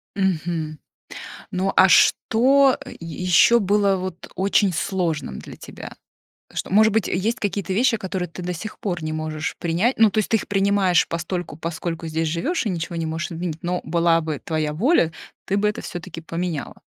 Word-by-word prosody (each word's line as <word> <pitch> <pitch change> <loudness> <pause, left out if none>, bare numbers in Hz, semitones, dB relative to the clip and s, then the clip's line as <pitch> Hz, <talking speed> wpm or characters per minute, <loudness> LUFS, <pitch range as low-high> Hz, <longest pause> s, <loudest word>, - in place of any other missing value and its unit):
Мгм. 165 -5 -1 0.7
Ну 190 0 -1
а 190 - +7
что, 265 +8 +4
э, - - -9
е 165 +1 -7
еще 185 +6 +6
было 200 -1 +2
вот 185 -1 -6
очень 195 0 +2
сложным 165 - -2
для - - -10
тебя? - - -10 0.6
Что, - - -4
может 215 +2 +5
быть, 220 - +1
есть 215 +6 -1
какие-то 200 -2 -2
вещи, 240 +2 +3
которые 190 -3 -3
ты 175 +2 -9
до 180 0 -3
сих 215 +6 -7
пор 175 -5 -3
не 155 - -3
можешь 155 0 -3
принять? 175 +10 0
Ну, 220 -1 +6
то 215 - -2
есть 215 - 0
ты 225 - +4
их - - -8
принимаешь 195 -3 +3
постольку, 170 -1 -4
поскольку 165 0 -4
здесь 160 +1 -1
живешь 265 - -1
и 215 - -1
ничего 170 -1 -4
не 165 - -2
можешь 160 +2 -3
изменить, 165 -1 -4
но 180 +1 -1
была 165 0 +2
бы 155 -2 -4
твоя 155 -2 -1
воля, 175 - +2 0.3
ты 195 - -1
бы 210 +1 +2
это 210 - -4
все-таки 175 -1 -7
поменяла? 165 -2 -4
180 Hz, 185 wpm, -22 LUFS, 165-200 Hz, 0.7 s, а